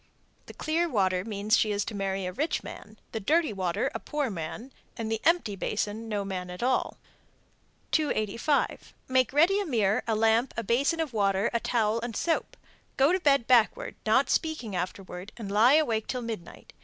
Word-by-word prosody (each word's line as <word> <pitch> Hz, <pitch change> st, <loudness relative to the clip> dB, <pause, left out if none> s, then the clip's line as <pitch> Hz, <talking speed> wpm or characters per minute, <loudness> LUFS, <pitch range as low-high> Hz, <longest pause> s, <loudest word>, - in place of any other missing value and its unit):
The -, -, -11 dB
clear 335 Hz, +2 st, 0 dB
water 185 Hz, -, +1 dB
means 210 Hz, 0 st, +1 dB
she 215 Hz, -, +2 dB
is 205 Hz, 0 st, -1 dB
to -, -, -5 dB
marry 195 Hz, -1 st, -2 dB
a 180 Hz, -, -4 dB
rich 300 Hz, -, -1 dB
man, 215 Hz, +1 st, -10 dB
the 225 Hz, -, -3 dB
dirty 310 Hz, -, +2 dB
water, 185 Hz, -3 st, -1 dB
a -, -, -3 dB
poor 290 Hz, -5 st, -2 dB
man, 195 Hz, +9 st, -6 dB, 0.3 s
and 225 Hz, -1 st, -3 dB
the 225 Hz, 0 st, -1 dB
empty 330 Hz, -, +2 dB
basin 215 Hz, +3 st, -3 dB
no 205 Hz, -2 st, -2 dB
man 185 Hz, -2 st, -4 dB
at 180 Hz, +5 st, -6 dB
all. 255 Hz, +1 st, 0 dB, 0.9 s
285. 280 Hz, -1 st, 0 dB
Make 260 Hz, -1 st, +2 dB
ready 335 Hz, +8 st, +4 dB
a 405 Hz, -, -1 dB
mirror, 215 Hz, -7 st, +2 dB
a 225 Hz, -, +1 dB
lamp, 225 Hz, +3 st, +2 dB
a 230 Hz, -, -1 dB
basin 275 Hz, -, +1 dB
of 305 Hz, -6 st, -3 dB
water, 200 Hz, 0 st, +1 dB
a 235 Hz, -, +2 dB
towel 225 Hz, -1 st, +1 dB
and 235 Hz, -2 st, -5 dB
soap. 330 Hz, -2 st, -1 dB, 0.4 s
Go 275 Hz, +4 st, +5 dB
to 370 Hz, -, +2 dB
bed 280 Hz, -7 st, +3 dB
backward, 255 Hz, -, +3 dB
not -, -, +3 dB
speaking 310 Hz, -, -1 dB
afterwards, 180 Hz, +1 st, -5 dB
and 210 Hz, -4 st, -6 dB
lie 230 Hz, +7 st, +6 dB
awake 230 Hz, -9 st, +1 dB
till 250 Hz, -2 st, -3 dB
midnight. 220 Hz, -7 st, -8 dB
225 Hz, 185 wpm, -28 LUFS, 200-275 Hz, 0.9 s, lie